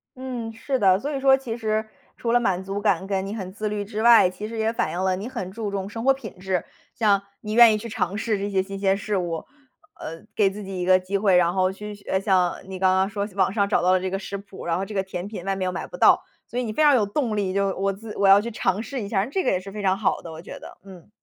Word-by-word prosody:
嗯， 250 Hz, -3 st, -5 dB
是 260 Hz, +4 st, -2 dB
的， 190 Hz, -2 st, +4 dB
所 290 Hz, +5 st, -4 dB
以 275 Hz, -, -2 dB
说 270 Hz, 0 st, +5 dB
其 245 Hz, -4 st, -5 dB
实 220 Hz, -1 st, -1 dB, 0.3 s
除 230 Hz, -, -2 dB
了 240 Hz, -, +5 dB
满 190 Hz, -5 st, 0 dB
足 195 Hz, +1 st, -4 dB
感 195 Hz, -3 st, +1 dB
和 195 Hz, -1 st, 0 dB
你 195 Hz, +2 st, -5 dB
很 185 Hz, -4 st, -6 dB
自 210 Hz, +1 st, -3 dB
律 205 Hz, -1 st, -3 dB
之 215 Hz, +1 st, -4 dB
外， 230 Hz, -5 st, +7 dB
其 195 Hz, +4 st, -7 dB
实 230 Hz, 0 st, -7 dB
也 220 Hz, +1 st, +1 dB
反 -, -, -1 dB
映 175 Hz, -, -4 dB
了 190 Hz, -1 st, +2 dB
你 200 Hz, +5 st, -5 dB
很 215 Hz, -8 st, -5 dB
注 215 Hz, +1 st, -4 dB
重 195 Hz, 0 st, -3 dB
生 225 Hz, +2 st, -6 dB
活 270 Hz, +1 st, +5 dB
品 230 Hz, -9 st, -10 dB
质。 185 Hz, -2 st, -1 dB, 0.3 s
像 205 Hz, -3 st, +3 dB, 0.2 s
你 210 Hz, 0 st, -4 dB
愿 230 Hz, -1 st, +8 dB
意 -, -, +1 dB
去 220 Hz, +2 st, -7 dB
尝 210 Hz, -3 st, -2 dB
试 220 Hz, -1 st, 0 dB
这 200 Hz, +1 st, -3 dB
些 190 Hz, -1 st, +1 dB
新 195 Hz, +1 st, -6 dB
鲜 195 Hz, 0 st, +2 dB
事 210 Hz, 0 st, -3 dB
物， 170 Hz, -3 st, -3 dB, 0.5 s
呃， 165 Hz, +1 st, -7 dB
给 200 Hz, -3 st, +4 dB
自 205 Hz, +2 st, -8 dB
己 190 Hz, -1 st, -6 dB
一 180 Hz, -, -1 dB
个 185 Hz, 0 st, +5 dB
机 185 Hz, +2 st, -2 dB
会， 195 Hz, -2 st, +3 dB
然 175 Hz, 0 st, +3 dB
后 185 Hz, 0 st, +2 dB
去 210 Hz, +2 st, -8 dB, 0.2 s
呃， 190 Hz, -, +2 dB
像 185 Hz, -3 st, +2 dB
你 190 Hz, -1 st, -7 dB
刚 185 Hz, 0 st, +3 dB
刚 190 Hz, +1 st, +2 dB
说 205 Hz, -1 st, -3 dB
网 190 Hz, -1 st, +2 dB
上 200 Hz, -2 st, +2 dB
找 -, -, +2 dB
到 180 Hz, +1 st, +3 dB
了 185 Hz, -, +4 dB
这 185 Hz, -, -2 dB
个 195 Hz, -, -2 dB
食 200 Hz, 0 st, -5 dB
谱， 195 Hz, -1 st, -11 dB
然 170 Hz, -1 st, 0 dB
后 190 Hz, -, -2 dB
这 205 Hz, -, -7 dB
个 195 Hz, -2 st, 0 dB
甜 185 Hz, -1 st, -6 dB
品 205 Hz, -4 st, -7 dB
外 195 Hz, -, 0 dB
面 190 Hz, -1 st, -2 dB
又 185 Hz, -, -1 dB
买 180 Hz, -, -5 dB
不 -, -, -10 dB
到， -, -, +5 dB, 0.2 s
所 245 Hz, -, -3 dB
以 -, -, -1 dB
你 220 Hz, -3 st, -4 dB
非 -, -, 0 dB
常 290 Hz, -2 st, +6 dB
有 215 Hz, -, +3 dB
动 215 Hz, 0 st, -1 dB
力， 190 Hz, -2 st, -1 dB
就 200 Hz, 0 st, +1 dB
我 195 Hz, +1 st, 0 dB
自 210 Hz, +2 st, -9 dB
我 200 Hz, -, +3 dB
要 195 Hz, +1 st, +8 dB
去 235 Hz, +2 st, -5 dB
尝 195 Hz, -2 st, 0 dB
试 265 Hz, +1 st, -5 dB
一 200 Hz, -, -4 dB
下 200 Hz, -2 st, 0 dB
儿。 195 Hz, -, +1 dB
那 265 Hz, -, -10 dB
这 380 Hz, +4 st, 0 dB
个 -, -, +2 dB
也 185 Hz, -, +1 dB
是 195 Hz, +1 st, -10 dB
非 210 Hz, -, -6 dB
常 190 Hz, 0 st, +2 dB
好 200 Hz, -3 st, 0 dB
的， 165 Hz, -, -9 dB
我 160 Hz, 0 st, -9 dB
觉 -, -, -9 dB
得。 -, -, -12 dB
嗯。 190 Hz, -2 st, -14 dB
200 Hz, 330 characters per minute, -24 LUFS, 190-220 Hz, 0.5 s, 愿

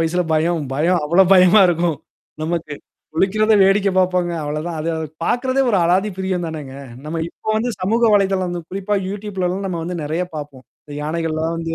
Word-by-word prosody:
வயசுல 165 Hz, +2 st, +1 dB
பயம். 160 Hz, +1 st, +1 dB
பயம் 170 Hz, +6 st, +2 dB
அவ்வளோ 170 Hz, +6 st, +5 dB
பயமா 185 Hz, +3 st, +6 dB
இருக்கும் 170 Hz, -2 st, 0 dB, 0.4 s
நமக்கு. 160 Hz, -2 st, -3 dB, 0.4 s
குளிக்கிறத 215 Hz, +5 st, +2 dB
வேடிக்க 195 Hz, +1 st, +3 dB
பாப்போங்க. 180 Hz, -1 st, +1 dB
அவ்வளோதான். 150 Hz, +3 st, -4 dB
அது 160 Hz, -, -3 dB
அது 160 Hz, 0 st, -3 dB, 0.2 s
பார்கறதே 255 Hz, +5 st, +1 dB
ஒரு 205 Hz, -, +3 dB
அலாதி 185 Hz, +5 st, +2 dB
பிரியம் 190 Hz, -2 st, -1 dB
தானேங்க. 150 Hz, -5 st, -7 dB, 0.3 s
நம்ம 160 Hz, +2 st, -3 dB
இப்போ 195 Hz, -, -11 dB
வந்து 235 Hz, +3 st, 0 dB
சமூக 220 Hz, +6 st, 0 dB
வலைதளம் 190 Hz, -3 st, +1 dB
குறிப்பா 195 Hz, +2 st, -2 dB
Youtubeலலாம் 195 Hz, -1 st, -3 dB
நம்ம 175 Hz, -3 st, -3 dB
வந்து 175 Hz, +2 st, -4 dB
நறைய 155 Hz, +4 st, -2 dB
பார்ப்போம். 145 Hz, -3 st, -8 dB, 0.2 s
இந்த 145 Hz, -, -10 dB
யானைகள்லாம் 160 Hz, +1 st, -2 dB
வந்து 165 Hz, 0 st, -3 dB
175 Hz, 165 wpm, -19 LUFS, 160-195 Hz, 0.4 s, பயமா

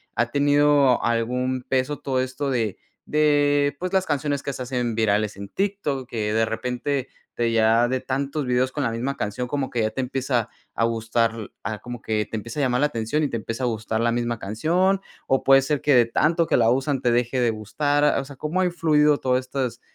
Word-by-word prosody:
ha 120 Hz, +1 st, 0 dB
tenido 145 Hz, -2 st, +3 dB
algún 125 Hz, +2 st, 0 dB
peso 130 Hz, +2 st, 0 dB
todo 130 Hz, -2 st, -1 dB
esto 130 Hz, +2 st, -3 dB
de 115 Hz, -6 st, -1 dB, 0.3 s
de, 145 Hz, -1 st, +2 dB
pues, 185 Hz, +1 st, -3 dB
las 190 Hz, -1 st, +2 dB
canciones 145 Hz, -1 st, -1 dB
que 140 Hz, -, -3 dB
se 130 Hz, -, -7 dB
hacen 125 Hz, -3 st, -2 dB
virales 105 Hz, -2 st, +1 dB
en 100 Hz, 0 st, -8 dB
TikTok, 190 Hz, -10 st, -2 dB
que 105 Hz, -2 st, -2 dB
de 110 Hz, 0 st, +3 dB
repente 125 Hz, +4 st, -3 dB, 0.2 s
te 120 Hz, -1 st, 0 dB
llega 115 Hz, +1 st, +4 dB
de 130 Hz, 0 st, 0 dB
tantos 135 Hz, +2 st, -2 dB
videos 125 Hz, +1 st, +1 dB
con 145 Hz, -, -2 dB
la 115 Hz, -, 0 dB
misma 130 Hz, +5 st, -3 dB
canción 105 Hz, +5 st, -3 dB
como 140 Hz, 0 st, -2 dB
que 120 Hz, -, -1 dB
ya 110 Hz, -, +1 dB
te 120 Hz, -, -7 dB
empieza 125 Hz, -3 st, -1 dB, 0.3 s
a 115 Hz, -, +1 dB
gustar 115 Hz, -1 st, -1 dB
a 110 Hz, -2 st, -4 dB
como 120 Hz, 0 st, -8 dB
que 105 Hz, -1 st, -1 dB
te 110 Hz, -, -3 dB
empieza 115 Hz, +8 st, -6 dB
a -, -, +2 dB
llamar 125 Hz, -1 st, +1 dB
la 150 Hz, -, +4 dB
atención 115 Hz, +6 st, -1 dB
y -, -, +2 dB
te 115 Hz, -, -2 dB
empieza 115 Hz, +3 st, -5 dB
a 125 Hz, -, +2 dB
gustar 110 Hz, -1 st, -2 dB
la 115 Hz, 0 st, +2 dB
misma 120 Hz, -1 st, -1 dB
canción, 170 Hz, -, +1 dB, 0.3 s
o 135 Hz, -, +1 dB
puede 135 Hz, 0 st, +6 dB
ser 145 Hz, 0 st, -1 dB
que 145 Hz, -3 st, +3 dB
de 120 Hz, -2 st, +6 dB
tanto 165 Hz, +8 st, +2 dB
que -, -, +3 dB
la 115 Hz, -1 st, +4 dB
usan 135 Hz, +2 st, 0 dB
te 120 Hz, -, +2 dB
deje 120 Hz, +2 st, +1 dB
de 120 Hz, -, +3 dB
gustar. 145 Hz, +8 st, +1 dB
O -, -, -3 dB
sea, 140 Hz, 0 st, -11 dB
¿cómo 160 Hz, +6 st, -1 dB
ha -, -, +3 dB
influido 150 Hz, -4 st, +3 dB
todo 130 Hz, -1 st, +1 dB
estas, 130 Hz, -1 st, -4 dB
130 Hz, 220 wpm, -23 LUFS, 115-145 Hz, 0.3 s, puede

